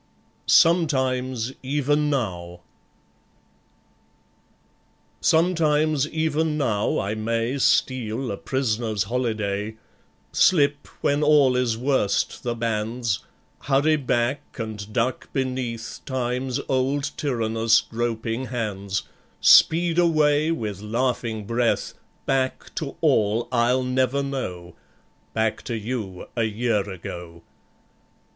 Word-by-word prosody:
Sometimes 130 Hz, -7 st, +2 dB
Even 145 Hz, +2 st, +1 dB
Now... 90 Hz, -10 st, -3 dB, 2.6 s
Sometimes 155 Hz, -3 st, +2 dB
even 160 Hz, 0 st, 0 dB
now 110 Hz, -8 st, 0 dB
I 100 Hz, +2 st, -1 dB
may 115 Hz, +4 st, -1 dB
Steal 125 Hz, -2 st, +1 dB
a 100 Hz, -, -4 dB
prisoner's 115 Hz, -5 st, -1 dB
holiday, 110 Hz, -3 st, -2 dB, 0.6 s
Slip, 145 Hz, -5 st, +3 dB
when 145 Hz, +1 st, +1 dB
all 145 Hz, -4 st, +5 dB
is 125 Hz, -3 st, +1 dB
worst, 130 Hz, -5 st, 0 dB
the 120 Hz, -2 st, -2 dB
bands, 115 Hz, -1 st, -1 dB, 0.5 s
Hurry 145 Hz, +3 st, +3 dB
back, 130 Hz, 0 st, -1 dB
and 110 Hz, -3 st, -6 dB
duck 120 Hz, +3 st, -1 dB
beneath 125 Hz, -4 st, -3 dB
Time's 125 Hz, -1 st, -2 dB
old 135 Hz, +2 st, 0 dB
tyrannous 115 Hz, -4 st, +2 dB
groping 115 Hz, +1 st, -3 dB
hands, 100 Hz, -5 st, -3 dB, 0.4 s
Speed 170 Hz, +1 st, +5 dB
away 155 Hz, -3 st, +3 dB
with 105 Hz, -, -3 dB
laughing 115 Hz, -1 st, -2 dB
breath 115 Hz, +2 st, 0 dB, 0.3 s
Back 130 Hz, -1 st, -1 dB
to 145 Hz, -4 st, -5 dB
all 115 Hz, -7 st, +2 dB
I'll 125 Hz, +1 st, +2 dB
never 130 Hz, +2 st, +1 dB
know, 90 Hz, -11 st, -5 dB, 0.6 s
Back 110 Hz, -1 st, 0 dB
to 115 Hz, -, -3 dB
you, 105 Hz, -5 st, -5 dB
a 115 Hz, -2 st, +1 dB
year 110 Hz, -2 st, 0 dB
ago. 85 Hz, -2 st, -8 dB
125 Hz, 95 wpm, -24 LUFS, 110-140 Hz, 2.6 s, all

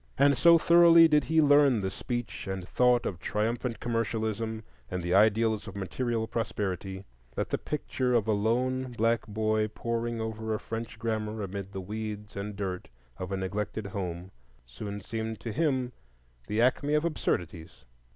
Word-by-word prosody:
And 140 Hz, 0 st, +5 dB
so 170 Hz, +4 st, +7 dB
thoroughly 170 Hz, 0 st, +7 dB
did 150 Hz, -2 st, +3 dB
he 160 Hz, 0 st, +3 dB
learn 145 Hz, -4 st, +5 dB
the 95 Hz, 0 st, -2 dB
speech 120 Hz, 0 st, -5 dB
and 95 Hz, -2 st, -4 dB
thought 125 Hz, +1 st, +3 dB
of 90 Hz, -, -3 dB
triumphant 115 Hz, +4 st, -2 dB
commercialism, 110 Hz, -1 st, -2 dB, 0.3 s
and 90 Hz, -1 st, -3 dB
the 85 Hz, +1 st, -1 dB
ideals 110 Hz, +1 st, +3 dB
of 100 Hz, -, -8 dB
material 115 Hz, +4 st, -2 dB
prosperity, 95 Hz, -4 st, -3 dB, 0.3 s
that -, -, -2 dB
the -, -, 0 dB
picture 130 Hz, -4 st, -1 dB
of 110 Hz, -2 st, +2 dB
a -, -, +3 dB
lone 125 Hz, +5 st, 0 dB
black 115 Hz, 0 st, +1 dB
boy 110 Hz, 0 st, 0 dB
poring 115 Hz, +1 st, -3 dB
over 110 Hz, 0 st, -3 dB
a -, -, -3 dB
French 115 Hz, 0 st, -6 dB
grammar 110 Hz, -1 st, -2 dB
amid 100 Hz, 0 st, -5 dB
the 95 Hz, -1 st, -5 dB
weeds 105 Hz, +1 st, -6 dB
and 100 Hz, +1 st, -5 dB
dirt 95 Hz, -3 st, -4 dB, 0.3 s
of 90 Hz, +1 st, -5 dB
a 95 Hz, -, -1 dB
neglected 100 Hz, +3 st, -3 dB
home 95 Hz, -2 st, -5 dB, 0.3 s
soon 100 Hz, -, -7 dB
seemed 110 Hz, +1 st, -4 dB
to 115 Hz, -, -4 dB
him 130 Hz, -1 st, 0 dB, 0.6 s
the 105 Hz, -, -1 dB
acme 145 Hz, +4 st, +2 dB
of 150 Hz, +2 st, +1 dB
absurdities. 85 Hz, -, -3 dB
110 Hz, 160 wpm, -29 LUFS, 100-120 Hz, 0.6 s, so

